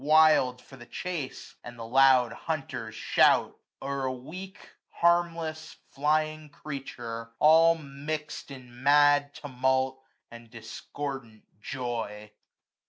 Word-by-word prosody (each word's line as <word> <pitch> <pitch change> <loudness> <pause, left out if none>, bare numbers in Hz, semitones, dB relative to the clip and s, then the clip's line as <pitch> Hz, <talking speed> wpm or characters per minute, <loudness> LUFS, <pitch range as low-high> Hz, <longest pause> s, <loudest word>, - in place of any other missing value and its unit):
Wild 155 -5 +4
for 135 - -14
the 120 -1 -13
chase; 170 -7 -6
and 120 0 -10
the 115 - -7
loud 130 -1 +4
hunters 125 -8 -5
shout; - - +3 0.3
0*er 135 0 -2
a 130 - 0
weak, 180 +10 -9 0.3
harmless, 165 -2 0 0.2
flying 155 +2 0
creature, 120 -6 -7
all 165 +2 +6
Mix'd 150 +1 -6
in 125 -2 -12
mad 145 0 +4
tumult, 130 -1 -1 0.3
and 115 -1 -12
discordant 115 +1 -7 0.2
joy. 115 -5 -5
135 Hz, 105 wpm, -28 LUFS, 125-155 Hz, 0.3 s, all